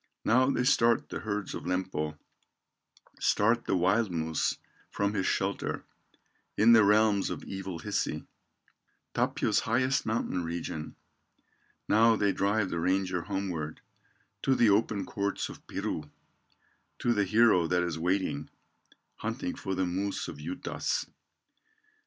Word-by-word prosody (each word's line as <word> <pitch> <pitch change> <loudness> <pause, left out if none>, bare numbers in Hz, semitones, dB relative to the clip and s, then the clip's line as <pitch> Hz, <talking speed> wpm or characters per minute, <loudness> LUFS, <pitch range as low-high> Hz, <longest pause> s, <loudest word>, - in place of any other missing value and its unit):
Now 130 +4 +4
they 125 - +1
start 120 -3 +3
the - - -4
herds 105 -2 -3
of - - -6
Lempo, 90 -5 -2 1.0
Start 115 +3 +2
the - - +1
wild 95 +5 +2
moose 80 -2 -1 0.3
from 100 0 -1
his 95 -2 0
shelter, - - -1 0.7
In 115 +3 +7
the 110 -2 +7
realms 105 -1 +4
of - - -5
evil 95 -2 -5
Hisi, 80 - -2 0.9
Tapio's - - +1
highest 130 +3 +1
mountain 110 -5 -1
region; 80 -2 -5 0.9
Now 115 +1 +5
they 100 -2 +2
drive 100 0 0
the 85 - -1
ranger 90 0 0
homeward, 90 -5 -4 0.6
To 135 - +2
the 115 -4 +5
open 105 0 +1
courts 100 0 -2
of - - -12
Piru, 75 -1 -4 0.9
To 120 - +1
the 105 -2 +2
hero 105 -4 +4
that 90 +1 +2
is 85 -2 -3
waiting, 90 -4 -1 0.7
Hunting - - -3
for 95 - -4
the 95 0 +1
moose 95 +3 -2
of - - -7
Juutas. 275 - -3
100 Hz, 130 wpm, -29 LUFS, 90-110 Hz, 1.0 s, In